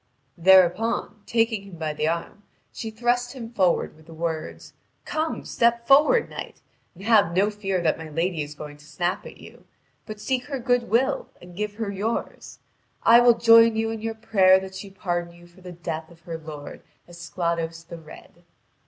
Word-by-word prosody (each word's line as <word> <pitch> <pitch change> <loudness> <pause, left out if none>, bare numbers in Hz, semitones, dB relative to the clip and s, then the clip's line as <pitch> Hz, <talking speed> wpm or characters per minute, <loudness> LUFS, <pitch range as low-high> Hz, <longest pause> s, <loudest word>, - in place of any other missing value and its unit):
Thereupon, 190 +4 +3
taking 225 -2 +1
him 195 -2 -12
by 155 -1 -3
the 155 +1 -1
arm, 170 +5 -3 0.3
she 225 - -6
thrust 245 +2 -1
him 235 -3 -9
forward 185 -6 +1
with 155 +1 -20
the 165 - -12
words: 160 -1 -5 0.3
"Come, 315 +1 -3
step 235 0 +1
forward, 300 - +5
knight, - - -8 0.4
and 190 - -13
have 205 -6 +3
no 200 +3 +3
fear 195 -4 -2
that 160 -1 +1
my 160 -1 -8
lady 165 +1 -1
is 145 0 -6
going 150 -1 -9
to 150 - -18
snap 175 +5 -3
at - - -12
you; - - -15 0.4
but 215 -1 -8
seek 250 +2 -2
her 280 -2 -4
good 245 -1 0
will 260 +5 +1
and 175 0 -14
give 210 +1 -4
her 215 -2 -3
yours. 210 +4 -4 0.5
I 235 +1 +7
will 240 -1 +5
join 230 -1 +6
you 225 0 -1
in 225 -1 -5
your 225 0 -3
prayer 190 -4 +4
that 190 0 -9
she 190 +1 -8
pardon 175 -3 -4
you 175 0 -16
for 175 +2 -20
the 180 0 -9
death 165 -2 -6
of 170 -1 -18
her 165 -1 -7
lord, 155 -2 -9 0.3
Esclados 170 -1 -4
the 170 0 -10
Red." 165 +2 -15
190 Hz, 190 wpm, -24 LUFS, 170-230 Hz, 0.5 s, I